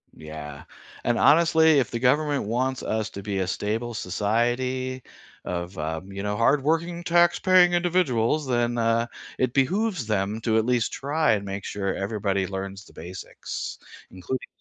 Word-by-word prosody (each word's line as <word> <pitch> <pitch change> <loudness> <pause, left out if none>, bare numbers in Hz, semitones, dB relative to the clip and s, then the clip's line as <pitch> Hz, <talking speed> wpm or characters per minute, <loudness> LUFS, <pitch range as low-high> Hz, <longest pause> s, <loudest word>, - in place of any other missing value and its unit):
Yeah, 75 -2 -9 0.4
and 120 - +1
honestly, 160 -1 +5
if 125 - 0
the - - -3
government 145 +3 +2
wants 130 +4 -1
us 110 0 -1
to 100 - -8
be 100 -2 -2
a 95 - -1
stable 110 +5 -2
society 120 +6 -1 0.4
of, 90 +1 -4
um, 80 +5 -4
you 100 0 -5
know, 105 0 -2
hardworking 160 +7 +1
taxpaying 175 +1 +4
individuals, 155 -6 +1
then, 120 -1 0
uh, 115 0 +2 0.3
it 130 -2 +1
behooves 180 - +1
them 105 0 -1
to 110 -1 +1
at 110 - +2
least 125 -2 +1
try 150 -1 +1
and 105 -2 +1
make 100 0 -5
sure 100 -2 -2
everybody 100 -1 -1
learns 95 +1 -6
the - - -18
basics, 90 +3 -7 0.3
including 95 +8 -5
115 Hz, 150 wpm, -25 LUFS, 100-140 Hz, 0.4 s, honestly